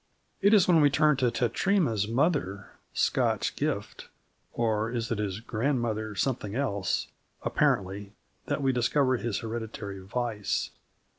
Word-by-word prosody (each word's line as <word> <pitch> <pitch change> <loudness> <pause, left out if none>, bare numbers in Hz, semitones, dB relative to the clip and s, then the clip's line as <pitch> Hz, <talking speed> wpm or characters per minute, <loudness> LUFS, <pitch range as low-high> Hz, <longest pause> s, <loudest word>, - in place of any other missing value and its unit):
It 205 +2 +6
is 195 -4 +5
when 170 -3 +5
we 145 - +6
turn 150 +1 +3
to 125 -2 +2
Tetratema's 120 - +1
mother, 115 - 0 0.2
Scotch - - +1
Gift - - -3 0.4
or 110 -1 0
is 115 -1 -3
it 115 - -1
his 100 0 -2
grandmother 115 -3 -1
something 110 -1 -1
else? 100 -9 -1 0.4
apparently, 100 -8 0 0.3
that - - -1
we 135 - +3
discover 130 +1 +2
his 115 -4 -2
hereditary 110 -3 -5
vice. 105 +1 -2
115 Hz, 130 wpm, -28 LUFS, 105-135 Hz, 0.4 s, It